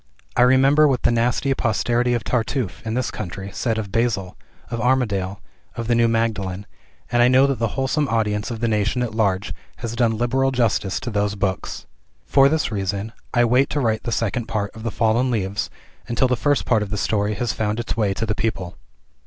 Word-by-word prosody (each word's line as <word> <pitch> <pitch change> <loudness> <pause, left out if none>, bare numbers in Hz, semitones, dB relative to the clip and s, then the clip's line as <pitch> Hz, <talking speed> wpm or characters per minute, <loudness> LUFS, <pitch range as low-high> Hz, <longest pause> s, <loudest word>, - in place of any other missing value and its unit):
I - - +3
remember 135 +4 +5
what 130 -4 0
the - - +4
nasty 125 +4 +1
posterity 120 0 +1
of 115 - -2
Tartuffe, 115 -3 -2
in 110 - -1
this 130 0 -1
country, 95 +2 -6
said 115 +2 -1
of 105 -3 -4
"Basil," 110 -5 0 0.4
of 115 -1 -2
"Armadale," 105 -7 0 0.4
of 115 - -4
"The 120 - +2
New 115 0 +4
Magdalen," 105 -4 -1 0.5
and 120 0 +3
I 120 - +6
know 130 +2 +5
that 140 -2 -1
the 115 +2 -2
wholesome 135 +2 +1
audience 105 -3 0
of 115 -2 -5
the 120 - +1
nation 110 +3 +1
at 120 - -3
large 100 -3 0 0.2
has 115 -1 -5
done 115 -2 +1
liberal 130 +3 +1
justice 115 -6 0
to 120 - -4
those 105 -1 0
books. 95 -2 -3 0.4
For 135 0 +5
this 155 -6 0
reason, 100 +2 -3 0.2
I 120 0 +3
wait 125 +4 +3
to 150 - -1
write 110 -4 +1
the 120 - -4
second 115 +1 -1
part 100 -2 -3
of 110 - -9
"The 115 - -2
Fallen 115 +6 +1
Leaves," 100 -4 -1 0.4
until 120 +2 +2
the 125 - +1
first 145 +3 +1
part 110 -3 +2
of 105 - -3
the 105 - -3
story 105 +1 0
has 120 +2 -1
found 105 +1 -1
its 120 - -3
way 105 -4 0
to 115 - -2
the 105 - 0
people. 100 -5 -3
115 Hz, 210 wpm, -22 LUFS, 105-125 Hz, 0.5 s, I